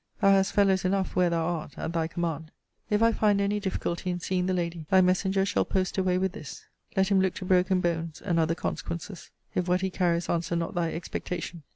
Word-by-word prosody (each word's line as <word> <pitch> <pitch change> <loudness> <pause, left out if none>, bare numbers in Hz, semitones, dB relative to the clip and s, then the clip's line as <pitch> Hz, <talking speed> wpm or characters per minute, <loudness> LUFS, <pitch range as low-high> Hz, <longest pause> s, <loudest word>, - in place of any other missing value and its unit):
Thou 195 - +5
hast 195 -1 +3
fellows 195 -2 +3
enough 190 0 0
where 180 -1 +3
thou 165 -1 0
art 165 -4 -4
at 160 - -4
thy 165 -1 0
command. 160 -2 -3 0.4
If 210 +1 +2
I 230 - +5
find 210 -2 +2
any 200 +1 +1
difficulty 185 -2 -3
in 175 0 -2
seeing 180 +1 -1
the 185 - +1
lady, 170 -3 -3
thy 190 - +6
messenger 190 +1 +2
shall 200 - +1
post 190 -1 -1
away 185 -1 +1
with 190 0 0
this. 215 - -9 0.3
Let 190 0 +3
him 195 -2 +4
look 190 -1 0
to 185 - -6
broken 185 0 +3
bones, 165 -2 -2
and 175 -4 0
other 165 +1 +2
consequences, 170 +2 -5 0.2
if 180 -1 -1
what 180 +1 +2
he 190 0 -1
carries 175 -2 0
answer 170 0 -1
not 170 -1 -2
thy 170 -2 0
expectation. 170 0 -5
180 Hz, 220 wpm, -27 LUFS, 170-190 Hz, 0.4 s, thy